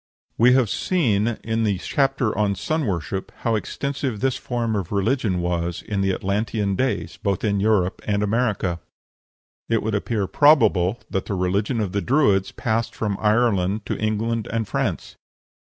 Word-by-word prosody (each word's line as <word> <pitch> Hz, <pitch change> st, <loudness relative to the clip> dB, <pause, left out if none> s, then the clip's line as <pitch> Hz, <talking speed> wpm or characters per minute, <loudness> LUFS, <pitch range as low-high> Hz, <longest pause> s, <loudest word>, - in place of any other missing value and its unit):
We 125 Hz, +2 st, +5 dB
have 130 Hz, -3 st, +4 dB
seen 115 Hz, -, +1 dB
in 115 Hz, 0 st, -1 dB
the 100 Hz, -3 st, +1 dB
chapter 135 Hz, +2 st, 0 dB
on 100 Hz, 0 st, +1 dB
sun 155 Hz, -, -1 dB
worship 95 Hz, +1 st, -3 dB
how 115 Hz, -, +1 dB
extensive 130 Hz, +1 st, -3 dB
this 130 Hz, +1 st, +1 dB
form 120 Hz, -3 st, -2 dB
of 95 Hz, -5 st, -3 dB
religion 100 Hz, -2 st, 0 dB
was 85 Hz, -1 st, -2 dB
in 100 Hz, -2 st, -2 dB
the 95 Hz, 0 st, +2 dB
Atlantean 100 Hz, +1 st, -1 dB
days, 130 Hz, +5 st, -1 dB
both 100 Hz, -3 st, -1 dB
in 100 Hz, -2 st, +1 dB
Europe 100 Hz, -3 st, +1 dB
and 105 Hz, -1 st, +1 dB
America. 105 Hz, -5 st, 0 dB, 0.9 s
It 115 Hz, -1 st, +1 dB
would 110 Hz, 0 st, -1 dB
appear 105 Hz, 0 st, -1 dB
probable 120 Hz, -, +4 dB
that 95 Hz, -, -1 dB
the 100 Hz, -, -2 dB
religion 100 Hz, +6 st, 0 dB
of 105 Hz, -4 st, -1 dB
the 100 Hz, -, -1 dB
Druids 105 Hz, -8 st, +2 dB
passed 115 Hz, 0 st, -2 dB
from 105 Hz, -3 st, -1 dB
Ireland 105 Hz, -2 st, +2 dB
to -, -, -3 dB
England 110 Hz, +1 st, -1 dB
and 115 Hz, -1 st, -1 dB
France. -, -, -3 dB
105 Hz, 160 wpm, -23 LUFS, 100-115 Hz, 0.9 s, We